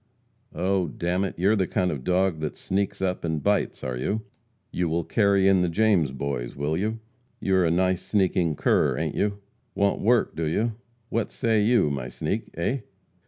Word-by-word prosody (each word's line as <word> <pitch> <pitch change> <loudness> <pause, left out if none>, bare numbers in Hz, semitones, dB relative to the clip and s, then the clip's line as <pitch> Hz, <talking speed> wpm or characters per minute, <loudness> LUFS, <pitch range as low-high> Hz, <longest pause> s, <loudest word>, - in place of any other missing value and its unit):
"Oh, 95 0 +1
d 75 +4 -7
n 90 +2 +1
it, 95 - -5
you 95 +4 +3
are - - +4
the 95 -4 +1
kind 90 -1 0
of 75 - -3
a - - -13
dog 90 +2 +1
that 75 -1 -4
sneaks 95 0 -2
up 90 -1 -1
and 80 -3 -2
bites, 100 0 0
are 65 -1 -2
you? 100 - -2 0.5
You 90 -2 -1
will 85 +1 0
carry 100 0 +3
in 95 -2 +5
the 90 - +1
James 95 -6 +2
Boys, 65 -3 -4
will 75 +3 -1
you? 110 +5 -2 0.4
You 95 - 0
are 90 - +3
a - - +2
nice 90 +1 +1
sneaking 90 -5 +1
cur, - - +2
ain't - - -2
you? 100 0 -1 0.3
Want 100 0 +1
work, 120 +3 +2
do 80 -1 -1
you? 110 +9 0 0.4
What 115 -2 -1
say 110 -4 +1
you, 110 -9 +3
my 65 -3 -4
sneak? - - -3
Eh?" 100 +11 -1
95 Hz, 205 wpm, -25 LUFS, 80-100 Hz, 0.5 s, in